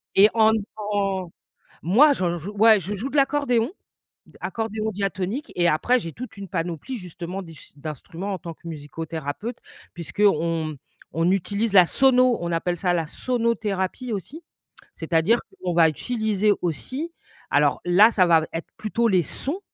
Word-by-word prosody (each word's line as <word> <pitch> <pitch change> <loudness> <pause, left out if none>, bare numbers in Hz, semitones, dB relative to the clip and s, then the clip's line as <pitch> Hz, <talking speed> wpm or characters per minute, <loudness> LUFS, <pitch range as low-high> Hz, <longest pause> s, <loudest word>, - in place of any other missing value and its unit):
Et 205 +2 +7
en 220 -1 +5 0.3
dans 200 -4 -2 0.5
moi, 260 - +6
j'en 175 -7 -1
joue. 175 +5 -7
Ouais, 215 +1 +6
je 195 +3 -5
joue 215 +7 -4
de 275 - -8
l'accordéon 275 -2 +2 0.7
accordéon 220 -1 -3
diatonique 195 - -3
et 175 - +3
après 170 +11 +3
j'ai 165 -8 -6
toute 250 +4 -8
une 200 -1 -7
panoplie 175 - -4
justement 180 0 -6
d'us 165 -4 -11
d'instruments 165 +6 -6
en - - -5
tant 165 0 -8
que 170 - -12
musicothérapeute 160 - -5 0.4
puisqu'on, 165 -1 +1
mmh, 155 -1 -6 0.4
on 165 +2 +1
utilise 200 +3 -1
la 185 -3 +8
sono. 255 +1 +4
On 170 0 -3
appelle 175 +1 -1
ça 180 +1 +1
la 165 -2 0
sonothérapie 230 +1 -2
aussi. 255 - -6 0.5
C'est 160 0 -7
à 165 - +5
dire 225 +9 +3
que - - -23
l'on 180 -1 -1
va 165 -1 +6
utiliser 215 +2 0
aussi 260 - -3 0.4
alors - - +3
là, 185 +5 +6
ça 185 -5 +4
va 170 -2 +5
v 160 - -5
être 165 - -5
plutôt 230 +2 0
les 185 -4 +3
sons, 285 - -2
195 Hz, 165 wpm, -24 LUFS, 170-225 Hz, 0.7 s, la